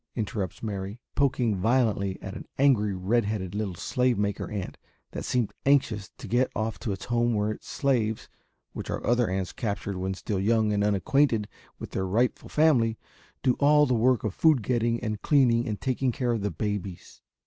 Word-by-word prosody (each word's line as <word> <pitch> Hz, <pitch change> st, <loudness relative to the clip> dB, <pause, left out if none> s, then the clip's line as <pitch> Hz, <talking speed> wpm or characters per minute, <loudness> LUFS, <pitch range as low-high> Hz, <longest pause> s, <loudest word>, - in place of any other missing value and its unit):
interrupts 105 Hz, -4 st, -3 dB
Mary, 100 Hz, 0 st, -4 dB
poking 125 Hz, -6 st, +1 dB
violently 105 Hz, -2 st, +1 dB
at 95 Hz, -, -6 dB
an -, -, -8 dB
angry 115 Hz, -8 st, +3 dB
red 105 Hz, +6 st, +1 dB
headed 100 Hz, -3 st, -3 dB
little 105 Hz, -3 st, -3 dB
slave 125 Hz, +6 st, 0 dB
maker 100 Hz, -1 st, -2 dB
ant 100 Hz, -3 st, -5 dB, 0.3 s
that -, -, -5 dB
seemed 120 Hz, -4 st, 0 dB
anxious 130 Hz, -7 st, +2 dB
to -, -, -9 dB
get 125 Hz, +2 st, +2 dB
off 110 Hz, 0 st, -2 dB
to 110 Hz, -, -3 dB
its 95 Hz, -, -5 dB
home 120 Hz, -1 st, +1 dB
where 105 Hz, +1 st, 0 dB
its -, -, -9 dB
slaves, 115 Hz, -6 st, 0 dB, 0.5 s
which -, -, -6 dB
are -, -, -3 dB
other 120 Hz, -2 st, +2 dB
ants 95 Hz, -1 st, -2 dB
captured 100 Hz, -3 st, -3 dB
when 95 Hz, +1 st, -2 dB
still 100 Hz, 0 st, -3 dB
young 110 Hz, +1 st, +2 dB
and 100 Hz, 0 st, +1 dB
unacquainted 105 Hz, +3 st, +2 dB, 0.3 s
with -, -, -8 dB
their 95 Hz, 0 st, -2 dB
rightful 120 Hz, +6 st, 0 dB
family, 125 Hz, -8 st, +3 dB, 0.5 s
do 130 Hz, -2 st, +4 dB
all 150 Hz, +1 st, +5 dB
the 130 Hz, -, +1 dB
work 120 Hz, +1 st, +3 dB
of 110 Hz, -, -2 dB
food 155 Hz, -4 st, +3 dB
getting 115 Hz, 0 st, +1 dB
and 110 Hz, -2 st, -3 dB
cleaning 125 Hz, -4 st, +3 dB
and 105 Hz, -2 st, -3 dB
taking 130 Hz, -1 st, 0 dB
care 125 Hz, -2 st, -1 dB
of 115 Hz, -3 st, -1 dB
the 105 Hz, -, 0 dB
babies. 100 Hz, -4 st, -5 dB
110 Hz, 185 wpm, -27 LUFS, 100-125 Hz, 0.5 s, all